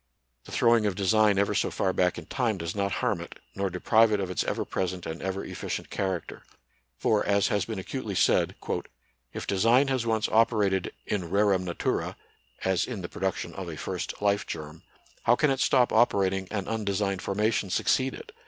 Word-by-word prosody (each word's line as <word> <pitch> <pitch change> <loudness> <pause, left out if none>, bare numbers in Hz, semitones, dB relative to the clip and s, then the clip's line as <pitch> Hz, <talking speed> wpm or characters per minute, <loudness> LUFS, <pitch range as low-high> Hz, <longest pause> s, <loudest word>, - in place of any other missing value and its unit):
The - - -12
throwing 115 -2 +4
of 100 - -1
design 105 +1 +3
ever 100 0 +2
so - - +1
far 95 - 0
back 90 0 +1
in - - -7
time 120 -6 -1
does 85 0 -4
not 100 -1 0
harm - - 0
it, - - -9 0.2
nor 100 0 -1
deprive 110 +5 +3
it 105 - +2
of 95 -2 -2
its 90 - 0
ever - - -1
present 90 -1 -3
and 80 +1 -5
ever 95 0 -3
efficient - - -5
character. 95 -3 -3 0.6
For, 105 -1 +2
as 100 0 +2
has 100 -3 +1
been 110 -1 -5
acutely 95 - -4
said, - - +3 0.4
" - - -44
If - - -5
design 115 +8 +3
has 130 -3 0
once 110 -2 +1
operated 105 -5 +2
in 95 -5 -2
rerum 100 -1 +2
natura 85 -1 -2 0.5
(as 95 -2 +2
in 110 -7 -6
the 85 - -5
production 95 +1 -3
of - - -6
a - - -7
first - - -4
life 100 0 +2
germ), 75 0 -7 0.4
how 120 - +6
can 150 +2 +2
it 135 - -1
stop 125 -3 +3
operating 95 -5 +2
and 100 -2 -3
undesigned 100 -3 -1
formation 105 0 0
succeed 130 +7 +1
it - - -11
100 Hz, 190 wpm, -27 LUFS, 95-110 Hz, 0.6 s, how